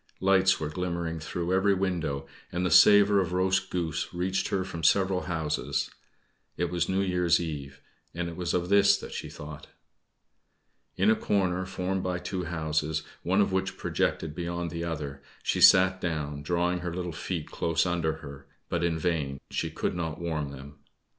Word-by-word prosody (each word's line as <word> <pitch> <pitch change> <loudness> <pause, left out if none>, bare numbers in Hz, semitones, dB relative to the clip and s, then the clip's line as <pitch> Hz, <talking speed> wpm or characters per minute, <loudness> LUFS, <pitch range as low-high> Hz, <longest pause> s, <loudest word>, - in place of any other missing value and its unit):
Lights 95 0 +4
were 80 - -2
glimmering 85 -1 -3
through 85 +3 -3
every 100 +1 +3
window, 85 -7 -1 0.3
and 90 +1 -1
the 90 - 0
savor 105 -1 +7
of 90 -1 -3
roast 95 +1 +1
goose 85 -3 -2
reached 95 +2 0
her 95 -1 0
from 90 -3 -6
several 95 +3 +3
houses. 80 -3 -1 0.7
It 85 -1 -1
was 85 -1 0
New 95 +1 +1
Year's 90 -3 +2
Eve, 70 -5 -6 0.3
and 85 0 -2
it 85 - -6
was 90 -1 -2
of 90 0 -1
this 100 0 +6
that - - -9
she - - -5
thought. 75 +1 -9 1.3
In 100 +4 +4
a - - +4
corner 95 -4 0
formed 95 0 -2
by 90 -1 -1
two 90 0 -4
houses, 80 -1 -1 0.2
one 95 +3 +2
of 100 - +1
which 95 0 -1
projected 80 -2 -1
beyond 85 0 -3
the 85 0 -4
other, 70 -4 -4 0.2
she - - 0
sat 95 0 +7
down, 75 -4 -3
drawing 90 +3 0
her 90 -1 -4
little 90 -1 -3
feet 80 0 -4
close 85 0 +1
under 85 -3 0
her, 70 -1 -10 0.2
but 85 -1 -1
in 85 -1 +1
vain 75 -5 -1
she - - -1
could - - -2
not 80 -3 -3
warm 80 -4 -2
them. 70 +1 -11
85 Hz, 175 wpm, -28 LUFS, 80-95 Hz, 1.3 s, savor